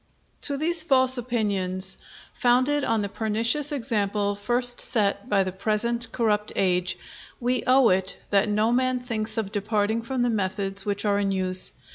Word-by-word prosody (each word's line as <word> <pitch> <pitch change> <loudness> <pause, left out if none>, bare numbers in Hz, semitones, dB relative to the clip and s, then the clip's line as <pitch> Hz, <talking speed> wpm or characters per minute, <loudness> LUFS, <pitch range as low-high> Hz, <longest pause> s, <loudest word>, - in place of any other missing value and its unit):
To 280 - -2
these 325 +3 +1
false 260 -4 +3
opinions, 195 -6 0 0.4
founded 255 +4 +2
on 225 -2 0
the - - -1
pernicious 225 +8 0
example 210 -6 -1
first 240 +4 +1
set 205 -1 0
by 195 -1 +3
the 185 - -4
present 225 +5 -1
corrupt 210 -3 0
age, 180 -1 +1 0.4
we 245 0 0
owe 255 -1 +5
it, 190 +1 0
that 200 +1 +3
no 215 +2 +1
man 255 +1 +1
thinks 220 -3 -3
of 210 -3 -2
departing 210 +1 -1
from 245 +2 -2
the 245 - +1
methods 195 -1 -2
which 200 +1 -1
are 200 -1 +2
in 200 -1 0
use. 185 -1 +2
215 Hz, 160 wpm, -25 LUFS, 200-245 Hz, 0.4 s, owe